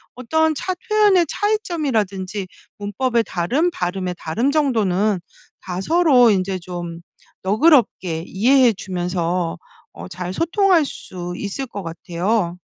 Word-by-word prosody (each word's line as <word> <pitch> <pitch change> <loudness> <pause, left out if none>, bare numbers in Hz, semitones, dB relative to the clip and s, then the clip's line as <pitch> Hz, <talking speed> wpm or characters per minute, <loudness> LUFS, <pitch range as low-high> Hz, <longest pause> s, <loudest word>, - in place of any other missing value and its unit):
어떤 315 +6 +1
차 370 +6 -2 0.2
표현의 415 -4 +4
차이점이라든지 225 - -1 0.3
문법의 230 +4 0
다름, 245 - 0
발음의 180 - -3
다름 230 - -1
정도는 215 - +1 0.4
다 180 -1 -5
서로 285 - +5
인제 190 -2 0
좀 175 -1 -7 0.4
너그럽게 205 - +3
이해해 245 +4 +4
주면서 180 -2 -2 0.4
어 - - -9
잘 180 0 -5
소통할 345 - +3
수 180 -8 -7
있을 205 +7 -4
것 200 -4 -7
같아요. 175 +3 -2
205 Hz, 255 characters per minute, -20 LUFS, 180-280 Hz, 0.4 s, 서로